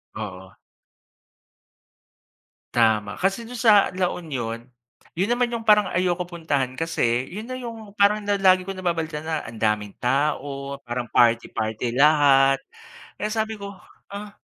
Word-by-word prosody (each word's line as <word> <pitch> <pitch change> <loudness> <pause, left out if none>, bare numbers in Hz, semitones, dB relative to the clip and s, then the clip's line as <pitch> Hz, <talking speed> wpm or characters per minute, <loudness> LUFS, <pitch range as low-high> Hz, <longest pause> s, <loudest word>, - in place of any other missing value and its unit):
Oo. 95 -3 -7 2.2
Tama, 110 -3 +2
kasi 195 +5 -1
do'n 250 - -7
sa 215 -4 +5
La 180 -1 +1
Union, 120 -9 -5 0.6
'yun 185 - +2
naman 245 0 +1
'yung 230 -1 -5
parang 210 -2 +5
ayoko 180 0 0
puntahan 145 -7 -2
kasi 125 -7 0
'yun 210 - -8
na 255 - -4
'yung 225 -4 -9
parang 205 +1 +4
la 205 0 0
lagi 185 -1 +5
ko 195 +1 -6
nababalitaan 165 -4 -2
na 160 -1 -2
ang 110 0 -10
daming 105 -2 0
tao, 140 +1 -1
parang 120 -1 -4
party-party 115 0 +1
lahat, 135 -2 +5 0.5
kaya 210 - -3
sabi 220 0 -1
ko, 200 -2 -8 0.4
ah 205 +1 -8
160 Hz, 135 wpm, -23 LUFS, 125-200 Hz, 2.2 s, sa